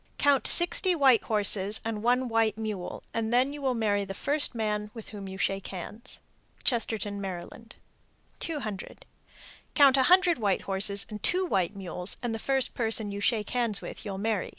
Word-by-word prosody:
Count 285 -2 +3
sixty 350 +1 +4
white 265 -7 +5
horses 205 -1 +2
and 220 -2 -3
one 250 +3 +2
white 225 -2 +1
mule, 215 -5 -5
then 240 +5 +1
you 295 - -8
will 260 -2 0
marry 205 -3 0
the 195 0 -7
first 285 +1 0
man 210 -2 -2
with 225 - -9
whom 200 -2 -8
you 190 0 -7
shake 195 0 -1
hands. 210 +6 -7 0.4
Chestertown, 215 -5 -1
Md. 195 +4 -7 0.7
200. 220 - -5 0.7
Count 275 -2 +6
a 265 - +4
hundred 360 -4 +5
white 200 -4 0
horses 200 +1 0
and 210 -1 -7
two 370 +1 +1
white 190 - 0
mules, 180 -1 -2
and 240 -2 -2
the 225 - -4
first 270 +2 +1
person 220 -3 0
you 200 0 -5
shake 215 -1 0
hands 235 -5 0
with - - -8
you'll 200 -3 -5
marry. 210 -1 -1
220 Hz, 175 wpm, -28 LUFS, 200-250 Hz, 0.7 s, Count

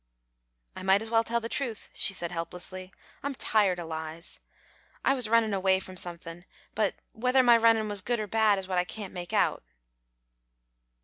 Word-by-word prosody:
"I - - -7
might 190 +3 +3
as 225 - -8
well 225 0 +4
tell 235 +1 0
the 230 - -4
truth," 255 -4 -3
she - - +1
said, 175 -3 -4
helplessly. 180 +2 -6 0.3
"I'm 280 -1 -3
tired 205 -7 +2
o' 170 - -5
lies. 160 +1 -6 0.7
I 270 - +5
was 250 -5 +1
runnin' 225 -2 +3
away 190 -1 +3
from 185 -1 -9
somethin', 175 -1 -5 0.3
but 210 -2 +1 0.2
whether 250 +3 +3
my 240 -1 +7
runnin' 225 -1 +4
was 205 -2 -3
good 240 +4 -1
or 215 - -2
bad 215 0 +3
is 190 -1 -5
what 185 -1 +1
I - - +2
can't 200 +1 -7
make 175 -1 -6
out." - - +2
200 Hz, 185 wpm, -28 LUFS, 180-230 Hz, 0.7 s, my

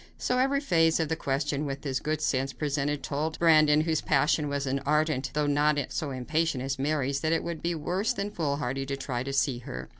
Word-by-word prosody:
So 250 0 0
every 275 +2 +2
phase 165 - +3
of 160 -2 0
the 160 - 0
question 145 +1 -1
which 135 0 -5
his 135 -3 -1
good 155 0 -2
sense 135 -2 0
presented 145 -1 -2
told 155 +3 -2
Brandon, 155 -2 +5
whose 160 -1 0
passion 150 0 +2
was 140 0 -2
as 135 +1 -1
ardent 150 -2 +1
though 150 +1 +1
not 145 +1 +2
so 155 - -3
impatient 140 +2 -1
as 135 +1 -3
Mary's, 140 -1 0
that 160 +2 0
it 165 - 0
would 170 -2 -5
be 170 0 -1
worse 180 +7 -1
than 200 +1 -3
foolhardy 140 -5 -2
to 140 0 -3
try 125 -3 -3
to 135 +2 -4
see 135 -2 +1
her. 65 - -7
150 Hz, 215 wpm, -28 LUFS, 135-160 Hz, -, Brandon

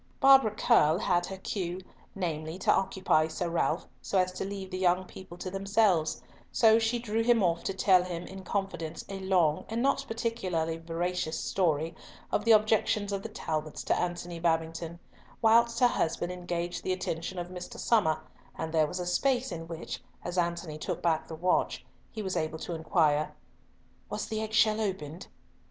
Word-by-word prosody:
Barbara 270 -4 +7
Curll 210 -7 +4
had 175 -2 +1
her 190 - -6
cue, 185 -2 -3 0.4
namely, 160 -3 -3
to 190 - +3
occupy 185 -5 +2
Sir 170 +2 -3
Ralf 165 0 0
so 195 - -1
as 185 0 +3
to 185 - -4
leave 195 -1 -6
the 185 - -3
young 185 0 +2
people 185 -1 -11
to 185 - -5
themselves, 195 -4 +1 0.3
so 225 -1 +5
she 225 +2 +1
drew 225 -1 -1
him 230 -2 +4
off 170 -1 +1
to 195 - -1
tell 185 -2 +5
him 175 -1 -5
in 190 0 -9
confidence 185 -4 -3
a 195 -1 -5
long 180 -5 +2
and 230 +2 -1
not 275 +1 +2
particularly 185 -8 -2
veracious 165 0 -2
story 165 -4 0 0.4
of - - 0
the 230 - +5
objections 215 -1 +3
of 195 - -2
the 225 - -6
Talbots 155 -7 -4
to - - +1
Antony 175 -1 -3
Babington; 165 0 -1 0.4
whilst 230 +1 +4
her 245 - +8
husband 175 -4 -1
engaged 175 -1 -3
the 185 - 0
attention 180 0 -4
of 175 0 -4
Mr. 185 +6 -8
Somer, 210 -12 +2 0.3
and 160 0 -4
there 155 -2 +4
was 180 - -5
a 180 - -3
space 250 +6 +1
in 165 -1 -6
which, 165 -1 -6 0.2
as 175 - -4
Antony 170 -3 -1
took - - -4
back 165 -2 +1
the 160 - -6
watch, 180 +3 0 0.3
he 215 - -5
was 190 -1 -2
able 155 0 -1
to 170 - -5
inquire 155 -2 +1 0.7
"Was - - -3
the 220 0 -3
egg 220 0 -4
shell 220 0 +4
opened?" 180 -5 -4
180 Hz, 180 wpm, -29 LUFS, 165-205 Hz, 0.7 s, her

